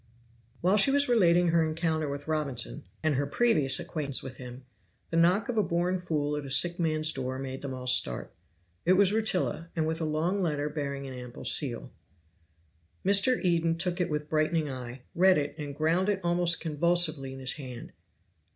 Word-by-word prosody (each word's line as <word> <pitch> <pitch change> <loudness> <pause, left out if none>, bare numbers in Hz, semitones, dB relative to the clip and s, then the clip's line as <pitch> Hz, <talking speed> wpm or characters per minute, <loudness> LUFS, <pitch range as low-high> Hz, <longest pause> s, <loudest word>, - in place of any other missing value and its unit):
While 185 +4 +3
she 210 - +5
was 285 +1 +3
relating 175 -7 +3
her 165 0 +3
encounter 160 -1 -1
with 145 +1 -6
Robinson, 150 -3 -2 0.2
and 155 -1 +2
her 140 +1 -1
previous 150 - +2
acquaintance 140 -5 -2
with 130 -1 -9
him, 125 0 -10 0.5
the - - -2
knock 180 +5 +3
of 230 -3 -1
a - - +5
born 175 +1 -1
fool 150 -4 -2
at 150 - -4
a 140 - -8
sick 170 +6 +4
man's 155 -2 +1
door 130 -1 -4
made 135 0 -6
them 140 - -6
all 130 0 -8
start. 65 - +2 0.5
It 180 - +4
was 195 0 +4
Rutila, 200 -6 -1
with 160 0 -1
a - - -1
long 155 +5 -1
letter 150 -6 -1
bearing 140 -2 -5
an 135 - -7
ample 125 -1 -9
seal. 125 -6 0 1.1
Mr. 200 +6 +4
Eden 165 -2 +1
took 180 +1 -1
it 175 - -1
with 150 -1 -3
brightening 155 0 0
eye, 125 0 -8
read 185 0 +4
it, 145 -1 -2
and 145 -2 -6
ground 165 +6 +1
it 200 -2 0
almost 175 0 +2
convulsively 155 -3 +2
in 135 - -9
his 130 0 -2
hand. 125 -5 -9
155 Hz, 185 wpm, -28 LUFS, 140-175 Hz, 1.1 s, she